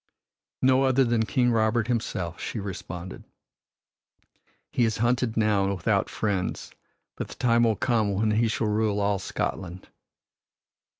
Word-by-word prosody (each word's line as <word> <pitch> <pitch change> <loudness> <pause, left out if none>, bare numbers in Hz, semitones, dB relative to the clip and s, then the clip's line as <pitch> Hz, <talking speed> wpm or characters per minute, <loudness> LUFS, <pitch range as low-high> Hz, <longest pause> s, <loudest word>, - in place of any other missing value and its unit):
"No 130 0 +5
other 135 0 +3
than 115 -2 +1
King 125 -2 +2
Robert 110 0 +2
himself," 95 -8 -2
she 115 - -4
responded. 90 -2 -7 1.5
"He 120 - +1
is 110 -1 +1
hunted 120 0 0
now 105 -3 +2
and 100 0 0
without 90 - 0
friends, 100 -4 -2 0.5
but - - -4
the - - -10
time 120 -1 +3
will 110 -2 +2
come 110 -3 +1
when 110 +2 +1
he 115 +2 +2
shall 110 0 -1
rule 105 -1 +1
all 100 -1 +1
Scotland." 90 -1 -4
110 Hz, 140 wpm, -26 LUFS, 100-120 Hz, 1.5 s, No